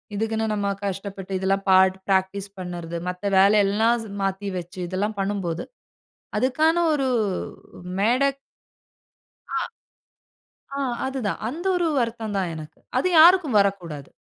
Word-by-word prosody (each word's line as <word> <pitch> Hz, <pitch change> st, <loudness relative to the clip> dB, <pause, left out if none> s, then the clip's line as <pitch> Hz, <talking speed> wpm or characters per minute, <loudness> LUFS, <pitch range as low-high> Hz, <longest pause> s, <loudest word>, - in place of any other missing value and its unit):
இதுக்குன்னு 220 Hz, +1 st, -1 dB
நம்ம 205 Hz, -1 st, -1 dB, 0.2 s
கஷ்டப்பட்டு, 195 Hz, 0 st, -5 dB
இதெல்லாம் 195 Hz, +1 st, 0 dB
பாட் 190 Hz, 0 st, +5 dB
பிராக்டிஸ் 195 Hz, +1 st, 0 dB
பண்ணுறது, 175 Hz, -2 st, -5 dB
மத்த 180 Hz, +2 st, -7 dB, 0.2 s
வேலை 200 Hz, +2 st, +6 dB
எல்லாம் 220 Hz, +4 st, +2 dB
ஸ் -, -, -9 dB, 0.2 s
மாத்தி 195 Hz, +1 st, -2 dB
வச்சு 180 Hz, +2 st, -10 dB
இதெல்லாம் 200 Hz, +3 st, -2 dB
பண்ணும்போது 195 Hz, -4 st, -2 dB, 0.7 s
அதுக்கான 310 Hz, +6 st, +2 dB
ஒரு 285 Hz, -3 st, +1 dB, 0.7 s
ஊ -, -, -11 dB, 0.2 s
மேடை 245 Hz, +7 st, +3 dB, 1.3 s
ஆ. -, -, +1 dB, 1.2 s
ஆ, -, -, -1 dB, 0.3 s
அது 265 Hz, 0 st, -3 dB
தான். 200 Hz, -, -1 dB
அந்த 335 Hz, +8 st, -5 dB
ஒரு 350 Hz, -1 st, +1 dB
வருத்தம் 230 Hz, -3 st, -2 dB
தான் 185 Hz, -3 st, -1 dB
எனக்கு. 155 Hz, -1 st, -10 dB, 0.2 s
அது 365 Hz, -, +1 dB
யாருக்கும் 325 Hz, -, +7 dB
வரக்கூடாது. 175 Hz, -8 st, -2 dB
200 Hz, 130 wpm, -24 LUFS, 190-230 Hz, 1.3 s, யாருக்கும்